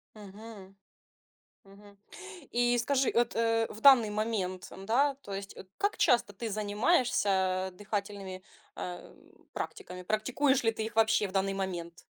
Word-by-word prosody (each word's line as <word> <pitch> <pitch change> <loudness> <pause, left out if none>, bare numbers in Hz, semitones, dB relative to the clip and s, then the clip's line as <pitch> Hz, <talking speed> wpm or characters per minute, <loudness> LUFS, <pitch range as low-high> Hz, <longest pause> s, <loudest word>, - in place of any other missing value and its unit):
Мгм. 205 -1 -12 0.9
Мгм. 200 +1 -17 0.5
И 240 0 +2
скажи, 265 +2 +1
от, 235 0 +1
э, 225 0 +2
в 215 - -10
данный 245 -6 +7
момент, 210 -4 -2
м-да, 245 +9 +1
то 205 -8 -9
есть 195 0 -7
от 190 - -11
как 405 +1 0
часто 240 -7 +3
ты 225 +4 -5
занимаешься, 215 - +1 0.4
э, - - -9
дыхательными, 200 -1 -5 0.3
э, 180 -1 -7 0.4
практиками? 180 0 -6
Практикуешь 255 +7 +1
ли 225 - +4
ты 220 0 -4
их 225 0 -7
вообще 220 -1 +3
в - - -11
данный 195 0 0
момент? 175 -3 -5
215 Hz, 145 wpm, -30 LUFS, 195-235 Hz, 0.9 s, данный